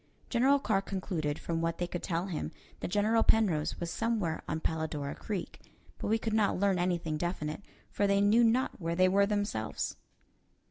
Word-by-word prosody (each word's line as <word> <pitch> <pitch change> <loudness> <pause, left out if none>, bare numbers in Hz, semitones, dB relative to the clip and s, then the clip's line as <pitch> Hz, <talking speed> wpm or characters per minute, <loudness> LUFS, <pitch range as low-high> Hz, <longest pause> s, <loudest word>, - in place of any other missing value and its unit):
General 260 +4 +4
Carr 215 -8 +1
concluded, 175 -7 -3
from 165 -1 -2
what 165 0 -1
they 175 - -1
could 175 0 -5
tell 170 0 -1
him, 180 -5 -4 0.3
that - - -3
General 210 +4 +2
Penrose 185 -11 +2
was 170 -1 -3
somewhere 220 -9 -1
on 160 - -2
Palladora 160 -3 -2
Creek; 205 -4 -5 0.4
but - - -3
we 220 +2 +3
could 225 -1 -3
not 215 -2 +2
learn 195 -2 +2
anything 170 -3 0
definite, 165 -1 -3 0.3
for 205 - +1
they 200 0 +3
knew 210 +4 +5
not 235 -1 +2
where 165 0 -1
they 185 +1 +5
were 200 +2 +4
themselves. 205 - -2
185 Hz, 180 wpm, -31 LUFS, 165-210 Hz, 0.4 s, knew